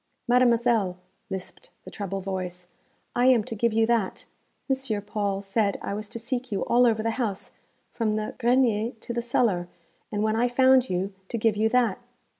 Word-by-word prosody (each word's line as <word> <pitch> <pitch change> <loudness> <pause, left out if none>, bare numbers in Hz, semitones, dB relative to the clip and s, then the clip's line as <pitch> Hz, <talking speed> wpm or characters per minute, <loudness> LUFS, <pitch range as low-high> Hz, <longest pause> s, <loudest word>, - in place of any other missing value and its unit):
'Mademoiselle,' 235 -6 +3 0.3
lisped 190 -2 -7 0.2
the - - -9
treble 195 -1 -4
voice, 180 -2 -5 0.5
'I 245 - +3
am 250 -4 +5
to 225 - -6
give 230 +2 +1
you 225 +1 +3
that. 230 -4 0 0.4
M. 265 -6 -1
Paul 200 -1 -2
said 200 0 0
I - - -4
was 210 0 -5
to - - -6
seek 245 +1 -3
you 200 - -1
all 245 +1 +4
over 220 -1 +1
the 225 - +1
house, 205 -5 -3 0.4
from 220 -3 -1
the 215 0 -2
grenier 240 -2 +2
to 230 +1 -7
the 235 - -1
cellar, 225 -7 +1 0.4
and 210 0 -1
when 215 0 +1
I 240 +2 +2
found 260 +1 +4
you 185 +2 -2
to 230 - -3
give 225 -1 +2
you 220 +1 +2
that.' 240 -4 +2
220 Hz, 185 wpm, -26 LUFS, 200-240 Hz, 0.5 s, am